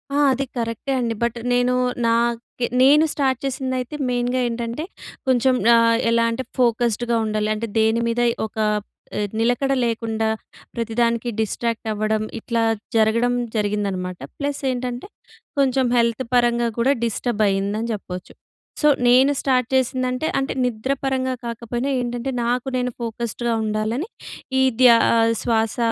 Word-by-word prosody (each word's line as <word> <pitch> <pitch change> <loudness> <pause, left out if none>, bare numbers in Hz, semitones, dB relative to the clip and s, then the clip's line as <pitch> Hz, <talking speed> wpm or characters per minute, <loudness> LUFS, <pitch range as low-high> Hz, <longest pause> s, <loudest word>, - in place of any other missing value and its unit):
ఆ! - - +2 0.2
అది 275 +2 -2
కరెక్టే 230 +3 -2
అండి. 235 -2 -1
బట్ 235 0 0 0.2
నేను 245 0 +2 0.3
నాకె 235 +1 0
నేను 295 +4 +6
స్టార్ట్ 265 -3 0
చేసిందైతే 260 0 -3
మెయిన్‌గా 245 +1 0
ఏంటంటే, 235 +4 -3 0.4
కొంచెం 255 0 +3 0.2
ఆహ్, 230 0 +4
ఎలా 230 0 +3
అంటే 260 +3 -3
ఫోకస్డ్‌గా 235 -1 +1
ఉండాలి. 215 0 -1
అంటే, 230 +2 -3
దేని 220 +1 +2
మీద 235 +1 0 0.2
ఒక 220 - -10 0.2
ఆహ్, 210 0 -4 0.5
నిలకడ 245 +4 +1
లేకుండా 225 -1 -1 0.5
ప్రతిదానికి 235 0 0
డిస్ట్రాక్ట్ 225 +1 -2
అవ్వడం. 215 0 0 0.2
ఇట్లా 230 0 -1 0.3
జరగడం 230 +2 +3 0.2
జరిగిందనమాట. 200 -4 -2 0.2
ప్లస్ 285 -1 -2
ఏంటంటే, 245 +3 -4 0.5
కొంచెం 265 -1 +2
హెల్త్ 235 +2 +1
పరంగా 240 -1 +3
కూడా 265 +4 +4
డిస్టర్బ్ 230 -1 0
అయిందని 200 +4 -1
చెప్పొచ్చు. 180 -3 -7 0.5
సో, 300 - +4 0.2
నేను 260 +3 +6
స్టార్ట్ 255 -3 +1
చేసిందంటే 255 +2 0
అంటే 270 - -2
నిద్ర 245 +2 -2
పరంగా 260 -1 0
కాకపోయినా 235 +2 -3
ఏంటంటే, 245 +2 -3
నాకు 245 +2 -1
నేను 250 0 -1
ఫోకస్డ్‌గా 235 +1 -2
ఉండాలని. 215 - -2 0.5
ఈ - - +5 0.2
ధ్యా 240 -2 +8 0.2
ఆహ్, 230 0 +3
శ్వాస 225 0 0
235 Hz, 130 wpm, -22 LUFS, 225-255 Hz, 0.5 s, ధ్యా